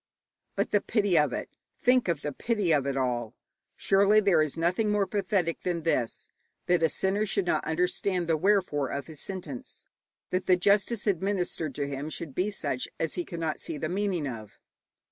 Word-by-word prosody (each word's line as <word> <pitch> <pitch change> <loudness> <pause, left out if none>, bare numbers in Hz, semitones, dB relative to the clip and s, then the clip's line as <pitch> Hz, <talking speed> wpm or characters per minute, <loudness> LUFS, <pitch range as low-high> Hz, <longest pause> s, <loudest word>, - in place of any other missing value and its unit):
But - - -1
the 205 - +3
pity 205 -5 +1
of 150 -4 +4
it - - -3 0.3
think 250 -2 +3
of 165 -4 -1
the 150 - -2
pity 205 - 0
of 140 -3 +2
it 135 -1 -1
all! 120 -4 -1 0.4
Surely 200 +2 +4
there 195 -6 +4
is 155 0 -1
nothing 180 +6 +1
more 205 -1 +2
pathetic 195 -4 -1
than 175 -3 -2
this: 125 -8 -1 0.4
that 175 -1 +2
a 160 - +4
sinner 195 +6 +1
should 195 -1 0
not 155 -3 +1
understand 180 +2 0
the 165 - +3
wherefore 180 -5 +2
of 140 - -4
his 155 -3 -8
sentence, 175 -10 -7 0.5
that 185 0 -1
the 185 - +6
justice 200 +4 +2
administered 180 - -1
to 145 -1 -2
him 140 +2 -4
should 155 -2 -6
be 185 +7 0
such 145 -10 -2
as 160 -2 -1
he 175 - -2
cannot 165 -2 -3
see - - -3
the 155 +2 -3
meaning 185 -5 -1
of. 110 -5 -8
175 Hz, 185 wpm, -28 LUFS, 150-200 Hz, 0.5 s, the